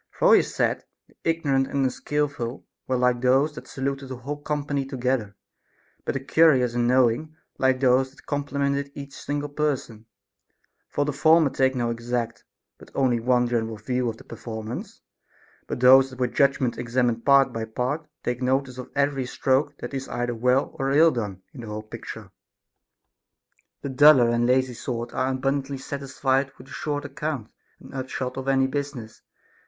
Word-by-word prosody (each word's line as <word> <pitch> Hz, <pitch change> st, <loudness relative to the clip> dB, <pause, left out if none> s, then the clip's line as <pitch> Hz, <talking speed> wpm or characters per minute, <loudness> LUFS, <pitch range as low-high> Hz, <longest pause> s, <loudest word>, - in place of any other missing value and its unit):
For -, -, +5 dB
he -, -, +6 dB
said, -, -, -1 dB, 0.2 s
the -, -, -26 dB
ignorant 140 Hz, -5 st, +1 dB
and 140 Hz, -1 st, 0 dB
unskilful 135 Hz, -1 st, -2 dB, 0.2 s
were 130 Hz, -, +1 dB
like 125 Hz, -1 st, +2 dB
those 135 Hz, +4 st, +3 dB
that -, -, -10 dB
saluted 135 Hz, 0 st, -4 dB
a 130 Hz, -, -4 dB
whole 145 Hz, +4 st, -6 dB
company 145 Hz, -1 st, -2 dB
together, 125 Hz, -6 st, -2 dB, 0.7 s
but -, -, -1 dB
the -, -, 0 dB
curious 135 Hz, -3 st, +4 dB
and 120 Hz, 0 st, +1 dB
knowing 130 Hz, +5 st, +2 dB, 0.2 s
like 130 Hz, -1 st, +3 dB
those 130 Hz, 0 st, +3 dB
that 135 Hz, 0 st, -21 dB
complimented 140 Hz, -1 st, -1 dB
each 140 Hz, -1 st, -8 dB
single 145 Hz, 0 st, -3 dB
person; 135 Hz, -7 st, -2 dB, 0.8 s
for 145 Hz, -, 0 dB
the 150 Hz, -, -2 dB
former 155 Hz, 0 st, +4 dB
take 130 Hz, 0 st, +2 dB
no 120 Hz, -2 st, 0 dB
exact, 115 Hz, -1 st, -3 dB, 0.4 s
but -, -, -14 dB
only 130 Hz, -3 st, +2 dB
one 125 Hz, +1 st, +2 dB
general 115 Hz, -2 st, -1 dB
view 125 Hz, +3 st, -1 dB
of 110 Hz, -, -6 dB
the -, -, -14 dB
performance; 110 Hz, 0 st, -7 dB, 0.7 s
but -, -, -4 dB
those 130 Hz, +1 st, +7 dB
that 130 Hz, -, -12 dB
with 125 Hz, -2 st, -1 dB
judgment 140 Hz, -3 st, +2 dB
examine 120 Hz, -1 st, 0 dB
part 140 Hz, +1 st, +4 dB
by 115 Hz, -, -3 dB
part 130 Hz, +8 st, -3 dB, 0.2 s
take 120 Hz, +1 st, -2 dB
notice 130 Hz, 0 st, 0 dB
of 125 Hz, -, -7 dB
every 140 Hz, -2 st, +1 dB
stroke 140 Hz, +3 st, 0 dB
that -, -, -7 dB
is 135 Hz, -1 st, -4 dB
either 120 Hz, 0 st, -2 dB
well 125 Hz, +6 st, +1 dB
or 135 Hz, 0 st, 0 dB
ill 160 Hz, +4 st, +6 dB
done 105 Hz, -7 st, -4 dB
in 135 Hz, -, -9 dB
the 115 Hz, -, -8 dB
whole 105 Hz, 0 st, -5 dB
picture. 110 Hz, -, -9 dB, 1.5 s
The 140 Hz, -, -3 dB
duller 135 Hz, -2 st, +6 dB
and 120 Hz, 0 st, +2 dB
lazy 130 Hz, 0 st, +2 dB
sort 120 Hz, 0 st, -5 dB
are 130 Hz, -, 0 dB
abundantly 135 Hz, +1 st, -1 dB
satisfied 135 Hz, 0 st, -1 dB
with 130 Hz, +2 st, -14 dB
a -, -, -15 dB
short 145 Hz, -1 st, -3 dB
account 145 Hz, -4 st, -4 dB, 0.3 s
and -, -, -14 dB
upshot 130 Hz, -1 st, -4 dB
of 135 Hz, 0 st, -5 dB
any 135 Hz, -1 st, +3 dB
business. 135 Hz, -4 st, -5 dB
130 Hz, 170 wpm, -25 LUFS, 120-140 Hz, 1.5 s, those